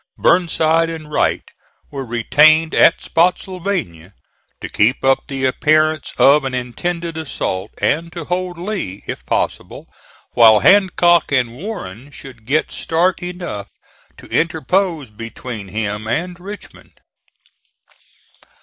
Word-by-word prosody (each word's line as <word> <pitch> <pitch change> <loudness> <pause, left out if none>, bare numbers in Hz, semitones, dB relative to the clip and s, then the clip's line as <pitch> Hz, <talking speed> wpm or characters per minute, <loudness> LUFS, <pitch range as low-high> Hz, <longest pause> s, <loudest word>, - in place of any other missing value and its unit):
Burnside 165 -2 +2
and 155 -2 -8
Wright - - +1 0.5
were 140 -1 -5
retained 150 +7 +3
at 165 - +4
Spottsylvania 175 - -1 0.4
to - - -6
keep 120 +6 +1
up 135 0 +2
the 135 -2 -3
appearance 155 +3 +1
of 145 +2 +5
an 130 -1 -3
intended 165 +7 -4
assault, 105 -10 -4
and 165 +3 0
to 165 -1 -7
hold 180 0 -3
Lee, 175 - -5
if - - -6
possible, - - -3 0.5
while 110 -3 +6
Hancock 175 -4 +4
and 125 -4 +1
Warren 135 - -8
should 130 -6 -13
get 150 +4 0
start 175 +3 0
enough 175 - -6 0.5
to - - -14
interpose 165 - 0
between 115 -1 -8
him 105 +1 -4
and 175 +9 -3
Richmond. 200 +3 -11
155 Hz, 115 wpm, -18 LUFS, 120-175 Hz, 0.5 s, while